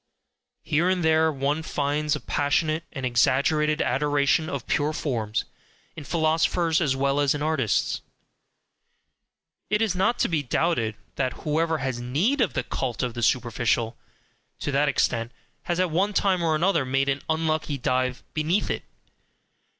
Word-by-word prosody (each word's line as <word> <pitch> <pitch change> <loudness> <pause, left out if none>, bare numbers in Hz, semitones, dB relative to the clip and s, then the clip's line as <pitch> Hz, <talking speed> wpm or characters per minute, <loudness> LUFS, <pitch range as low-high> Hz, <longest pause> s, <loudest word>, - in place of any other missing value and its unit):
Here 165 +3 +1
and 185 -2 +1
there 160 0 +4
one 145 +2 -1
finds 150 0 -1
a - - -4
passionate 155 +3 0
and 135 -5 -4
exaggerated 140 +5 +2
adoration 145 +4 +1
of 140 -3 -4
"pure 150 +1 0
forms" 115 -9 -2 0.5
in 150 - -8
philosophers 165 +1 +1
as 140 -5 +1
well 140 +1 +1
as 145 0 +2
in 145 - -3
artists: 145 - 0 1.7
it 210 - +2
is 220 -4 +1
not 220 +6 +1
to - - +2
be 160 -4 0
doubted 125 -5 0 0.2
that 130 -2 0
whoever 160 +2 +1
has 130 -3 -3
NEED 175 - +1
of 220 - +1
the - - -1
cult 130 -1 -3
of 125 -2 -2
the 120 - -5
superficial 120 -1 +1 0.6
to - - -3
that 140 +1 +2
extent, 120 -3 0 0.3
has 175 0 -1
at 185 -2 +1
one 195 +6 +1
time 190 -2 +2
or 160 -2 +2
another 175 -1 +2
made 135 +1 0
an 140 0 0
unlucky 160 -2 0
dive 130 0 -1
BENEATH 160 +6 0
it. - - -3
150 Hz, 155 wpm, -25 LUFS, 130-160 Hz, 1.7 s, there